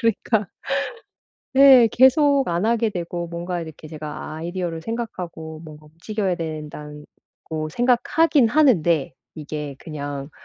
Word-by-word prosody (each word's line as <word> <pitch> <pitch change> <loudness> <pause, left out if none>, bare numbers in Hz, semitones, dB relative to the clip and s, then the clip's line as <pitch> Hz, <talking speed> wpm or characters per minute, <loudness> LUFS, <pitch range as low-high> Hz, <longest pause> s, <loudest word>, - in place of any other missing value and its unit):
그러니까 220 -3 0 1.1
네 265 -3 +8
계속 275 +1 +4
안 175 +4 0
하게 230 -1 +2
되고 175 -2 -4
뭔가 175 +1 -4
이렇게 160 -1 -9
제가 155 -1 -7
아이디어를 170 0 -4
생각하고 170 -7 -6
뭔가 155 -1 -12
움직여야 185 +4 -3
된단 150 -2 -7 0.4
고 155 -1 -4
생각하긴 250 - +3
하는데 175 - +3 0.2
이게 150 -2 -6
그냥 145 -2 -6
170 Hz, 275 characters per minute, -22 LUFS, 155-230 Hz, 1.1 s, 네